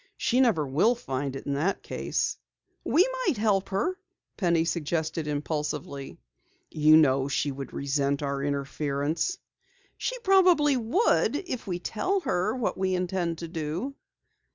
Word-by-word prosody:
She 250 - +1
never 225 - +3
will 165 - +3
find 135 - -4
it 135 - -7
in 140 - -1
that 165 +8 -1
case." - - -2 0.4
"We 360 +8 +4 0.2
might 295 - +2
help 205 -3 +1
her," 355 - -1 0.4
Penny 170 -4 +2
suggested 160 -1 -2
impulsively. 150 -2 -3 0.5
"You 155 0 +6
know 135 -3 +4
she 140 +1 0
would 135 0 -7
resent 140 0 -1
our 140 -1 -2
interference." 145 - -1 0.6
"She - - -2
probably 360 -7 +5
would 250 - +2
if 255 - -4
we 180 -2 -1
tell 370 - -1
her 200 - 0
what 245 -6 -2
we 190 -1 +1
intend 180 -2 -1
to 170 - -6
do." 165 - -4
170 Hz, 140 wpm, -27 LUFS, 145-230 Hz, 0.6 s, You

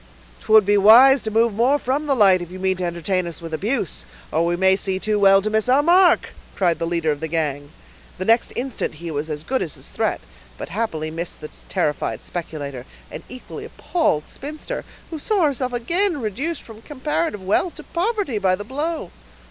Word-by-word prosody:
"'Twould 215 -2 +5
be 205 +1 +3
wise 250 +7 +8
to 220 - -3
move 225 +1 +2
more 245 +7 +3
from 285 +3 -2
the 275 - +2
light, 195 -6 +5
if 175 - -7
you 185 - -9
mean 190 0 0
to 180 - -5
entertain 175 +1 -1
us 170 - -7
with 165 -1 -8
abuse, 210 +4 -1 0.3
or 160 - +1
we 170 +1 +1
may 190 +1 +4
see 190 -1 -1
too 210 +2 0
well 195 -1 +6
to 215 - 0
miss 220 +2 +1
our 270 +3 +4
mark," 355 +2 +4 0.2
cried 175 -4 +1
the 165 - -1
leader 165 -2 0
of 145 - -3
the 160 - -3
gang. 145 -3 -2 0.5
The 185 - -3
next 230 +2 +3
instant 250 -9 -3
he 165 +2 -7
was 150 +1 -3
as 150 0 -4
good 260 +8 -1
as 155 - -3
his - - -11
threat, - - -1 0.4
but - - -7
happily 165 -6 -3
missed 165 +2 -5
the 150 - -8 0.2
terrified 130 -6 -1
speculator 145 -7 -6 0.2
and - - -7
equally 255 0 -9
appalled 240 - -1
spinster, 305 - -7 0.3
who 320 - -5
saw 405 +3 +1
herself 265 -4 0
again 340 - 0
reduced 270 - -3
from 220 -1 -13
comparative 295 - -3
wealth 210 - 0
to - - -10
poverty, 370 - -1
by 185 -2 +2
the 205 +2 -8
blow. 295 - -3
205 Hz, 205 wpm, -21 LUFS, 170-270 Hz, 0.5 s, wise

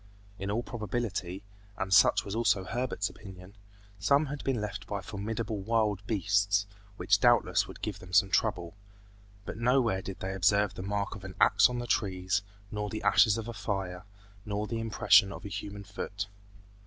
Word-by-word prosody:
In 100 +1 -4
all 115 +4 -1
probability, 105 -5 -4 0.3
and 95 0 -1
such - - +5
was 100 - -5
also 110 -4 +2
Herbert's 115 0 -2
opinion, 95 -1 -12 0.5
some 140 +9 +3
had 145 0 -6
been 130 -4 0
left 105 -2 -5
by 100 - -3
formidable 105 +2 -4
wild 105 -2 +1
beasts 100 -1 +2 0.3
which - - +3
doubtless - - +3
would - - -12
give - - -3
them 90 - -12
some 95 +1 +4
trouble; 90 -6 0 0.7
but - - -6
nowhere 115 -5 +2
did 95 0 -7
they 95 +1 -3
observe 100 +2 +2
the - - -7
mark 100 +1 -2
of 95 - -10
an 95 -1 -8
axe - - +6
on 125 - -3
the 120 - -3
trees, 95 -3 0 0.3
nor 105 -1 -3
the 110 - -5
ashes 105 +1 +5
of 115 0 -5
a 120 - -5
fire, 95 -5 -4 0.4
nor 105 0 -2
the 115 +1 -3
impression 105 -2 +4
of - - -9
a - - -5
human 100 0 -6
foot. 100 +1 -5
100 Hz, 180 wpm, -30 LUFS, 95-110 Hz, 0.7 s, axe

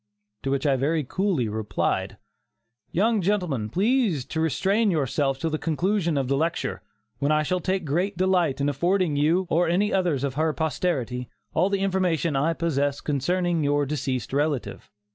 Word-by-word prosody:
to 135 - -3
which 140 +1 0
I 140 -2 +3
very 150 +4 0
coolly 175 - 0
replied: 105 -2 -2 0.7
"Young 215 +3 +2
gentleman, 175 - 0
please 200 - +1
to 160 - -3
restrain 195 - +2
yourself 140 -4 0
till 160 +3 -2
the 155 - -1
conclusion 170 0 0
of 135 -2 0
the 140 - +1
lecture, 165 +4 -1 0.4
when 140 +3 +1
I 155 0 +3
shall 180 +4 0
take 185 0 -1
great 175 +6 -1
delight 180 -7 +2
in 140 - +1
affording 170 +3 +1
you, 160 +6 +2
or 170 +1 +3
any 200 +5 +1
others 175 -8 +1
of 140 -2 -1
her 155 +2 0
posterity, 130 -6 -2 0.2
all 190 - +2
the 200 -1 0
information 180 -5 +1
I 150 +5 +2
possess 145 -4 0
concerning 170 +4 0
your 145 0 +2
deceased 135 -3 -3
relative." 145 -2 -1
160 Hz, 165 wpm, -25 LUFS, 140-185 Hz, 0.7 s, I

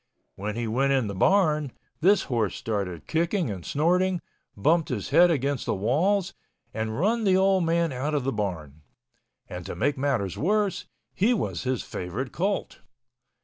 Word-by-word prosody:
When 105 +2 -4
he 120 0 -2
went 135 +5 +1
in 130 -4 +2
the 100 - -4
barn, 155 - +2 0.3
this 190 +3 +4
horse 115 -6 -1
started 100 -7 -3
kicking 170 - 0
and 95 -4 -6
snorting, 180 - +1 0.4
bumped 160 +10 +2
his 110 -6 -3
head 175 0 +6
against 140 -4 -1
the - - +1
walls 165 - +1 0.4
and 110 0 -3
run 225 +6 +1
the 190 -2 +4
old 190 -2 +3
man 165 -1 +1
out 145 +4 -2
of 140 - 0
the 135 - 0
barn—and 80 - -8
to - - -5
make 140 +3 0
matters 130 -10 -1
worse, 205 +3 0 0.3
he 230 +6 +2
was 200 - -3
his 130 -2 -1
favorite 110 +9 -5
colt. 195 +3 -2
140 Hz, 160 wpm, -26 LUFS, 110-180 Hz, 0.4 s, head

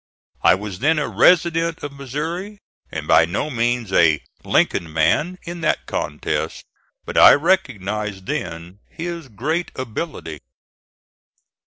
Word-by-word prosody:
I - - +6
was 95 -1 -7
then 155 +6 +2
a 150 - 0
resident 165 -1 +3
of 145 - -4
Missouri, 160 - -5 0.3
and - - -5
by 85 - +6
no 100 - -3
means 120 -4 -1
a 80 -4 +5 0.2
"Lincoln 80 -2 +1
man" 80 - +1
in 170 0 -7
that - - 0
contest; - - -3 0.4
but - - 0
I - - +10
recognized 105 - -1
then 85 +4 -5
his 170 -2 -6
great 150 - -2
ability. 120 - -5
130 Hz, 125 wpm, -21 LUFS, -, 0.4 s, I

